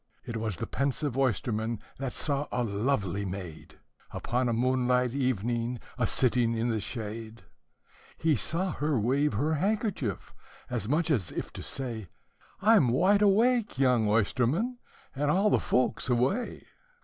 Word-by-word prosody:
It 115 - -5
was 110 -3 -2
the - - -4
pensive 140 -1 -1
oysterman 115 -3 0 0.2
that 135 -2 -2
saw 145 -1 -2
a 125 - 0
lovely 100 -3 -1
maid, 90 -4 -7 0.3
Upon 125 +1 -1
a - - +1
moonlight 125 +1 +2
evening, 120 -2 -1 0.2
a 120 -3 0
sitting 120 -2 +2
in 115 +2 0
the 110 - 0
shade; 110 +1 -6 0.7
He 160 -2 +2
saw 175 - -1
her 150 -4 0
wave 135 +5 +1
her 145 +10 +1
handkerchief, 190 - -1 0.4
as 115 -3 -2
much 165 +3 +1
as 105 - +1
if - - -5
to - - -7
say, 115 -8 -3 0.5
"I 225 +2 +7
'm 140 - +4
wide 190 - +3
awake, 220 - +3
young 125 -5 +3
oysterman, 130 - +1 0.4
and 145 +2 0
all 195 +6 +3
the - - +4
folks 130 0 +1
away." 130 - 0
125 Hz, 150 wpm, -29 LUFS, 115-150 Hz, 0.7 s, I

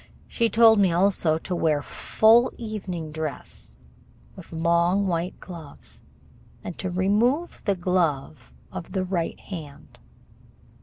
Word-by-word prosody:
She 230 -2 0
told 225 -1 +6
me 190 -3 +4
also 175 -3 +2
to 180 +2 -4
wear 155 -4 +1
full 230 +3 +3
evening 190 -8 -5
dress, 155 - -6 0.6
with - - -13
long 170 +4 +2
white 175 0 -2
gloves, 165 -6 -11 0.6
and 180 - -6
to 185 - -3
remove 215 - +1
the 200 -2 +2
glove 170 - -1 0.2
of 165 - -8
the 190 -2 0
right 180 -3 -2
hand. 155 -7 -10
180 Hz, 120 wpm, -25 LUFS, 165-200 Hz, 0.6 s, told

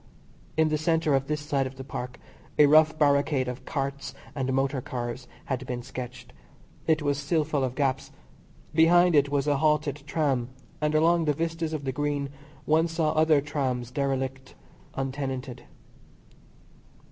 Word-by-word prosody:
In 160 0 +4
the 155 0 0
centre 160 -1 +2
of 135 0 +1
this 150 0 -1
side 140 -3 0
of 130 - -10
the 130 - -8
Park 125 -2 -6 0.4
a 150 - +8
rough 155 +2 +5
barricade 140 -2 +2
of 125 +1 -6
carts 140 -1 -3 0.2
and 135 -2 -2
motor 135 0 0
cars 120 0 -5 0.2
had 130 -1 -2
been 120 -1 -4
sketched. 125 -1 -8 0.5
It 160 -2 +2
was 145 -1 0
still 150 +2 +1
full 150 -2 -1
of 130 -1 -2
gaps. 135 -2 -1 0.6
Behind 175 +2 +5
it 145 -2 +4
was 140 -1 0
a 145 -1 +2
halted 150 -1 +1
tram, 140 -6 0 0.3
and 150 0 +1
along 165 +1 +4
the 150 - +2
vistas 165 +1 -2
of 155 -2 -3
the 135 - -1
Green 145 0 -2 0.4
one 160 +2 +3
saw 165 -2 0
other 155 -2 +4
trams 130 -4 -2
derelict, 135 -1 -2 0.4
untenanted. 135 -2 -4
140 Hz, 160 wpm, -27 LUFS, 130-155 Hz, 0.6 s, a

